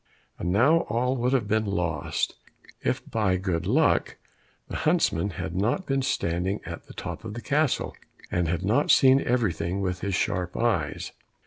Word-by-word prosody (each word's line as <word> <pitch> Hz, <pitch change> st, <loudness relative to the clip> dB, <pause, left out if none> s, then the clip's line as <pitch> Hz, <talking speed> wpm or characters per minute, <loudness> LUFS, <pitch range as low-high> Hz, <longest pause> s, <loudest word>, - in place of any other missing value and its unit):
And 90 Hz, -, -1 dB
now 130 Hz, -, +5 dB
all 125 Hz, +4 st, +1 dB
would 125 Hz, +1 st, +1 dB
have 125 Hz, -6 st, +1 dB
been 110 Hz, +1 st, +1 dB
lost 85 Hz, -5 st, -1 dB, 0.5 s
if -, -, -1 dB
by 100 Hz, -5 st, +1 dB
good 90 Hz, -2 st, -2 dB
luck 145 Hz, +8 st, +2 dB, 0.5 s
the -, -, -4 dB
huntsman 85 Hz, +5 st, +1 dB
had 85 Hz, -1 st, -5 dB
not 115 Hz, -, 0 dB
been 135 Hz, 0 st, 0 dB
standing 95 Hz, -6 st, -1 dB
at 85 Hz, +1 st, -8 dB
the -, -, -11 dB
top -, -, -6 dB
of 110 Hz, -1 st, -6 dB
the -, -, -4 dB
castle, 145 Hz, +2 st, 0 dB, 0.4 s
and 90 Hz, -1 st, +1 dB
had 85 Hz, +2 st, -1 dB
not 120 Hz, +9 st, +2 dB
seen 135 Hz, 0 st, +6 dB
everything 100 Hz, -6 st, 0 dB
with 95 Hz, -1 st, -2 dB
his 100 Hz, -2 st, -1 dB
sharp 90 Hz, +1 st, -1 dB
eyes. 110 Hz, -12 st, 0 dB
100 Hz, 170 wpm, -26 LUFS, 90-125 Hz, 0.5 s, seen